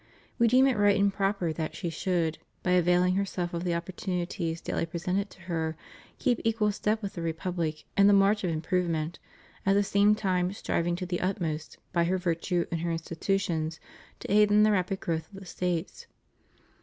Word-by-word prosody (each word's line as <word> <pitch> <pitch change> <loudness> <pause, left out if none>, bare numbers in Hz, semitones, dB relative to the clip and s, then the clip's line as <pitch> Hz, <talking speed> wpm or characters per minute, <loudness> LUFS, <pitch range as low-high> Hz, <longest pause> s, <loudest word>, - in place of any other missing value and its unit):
We 235 - +5
deem 255 +3 +5
it 260 -4 +2
right 205 -1 +4
and 200 0 +3
proper 195 -4 0
that 155 0 -4
she 170 -3 -3
should, 165 -1 -1 0.2
by 180 - +1
availing 180 0 +4
herself 185 -3 -2
of 170 0 -2
the 175 -2 0
opportunities 175 -1 -3
daily 165 - -2
presented 180 +4 -2
to 190 - -17
her, 165 -2 -2 0.4
keep 245 -4 +1
equal 220 -2 +2
step 215 +2 -1
with 200 - -4
the 170 - -5
Republic 165 -1 -2
in 200 0 +6
the - - +7
march 200 +1 +4
of 180 - +1
improvement, 165 0 -1 0.4
at 195 - +3
the 200 +1 +4
same 200 +1 +4
time 185 -3 0
striving 175 -3 -1
to 180 +1 -4
the 180 -1 -2
utmost, 165 -5 -2 0.2
by 170 -1 +3
her 185 +2 +1
virtue 175 0 0
and 165 -1 -2
her 170 - -1
institutions, 165 -1 -2 0.4
to - - -5
aid 210 0 +5
in 210 +1 +5
the 215 - +5
rapid 190 -1 0
growth 160 0 -3
of 195 - -10
the 195 - -11
States. 180 0 -3
180 Hz, 190 wpm, -28 LUFS, 170-200 Hz, 0.4 s, the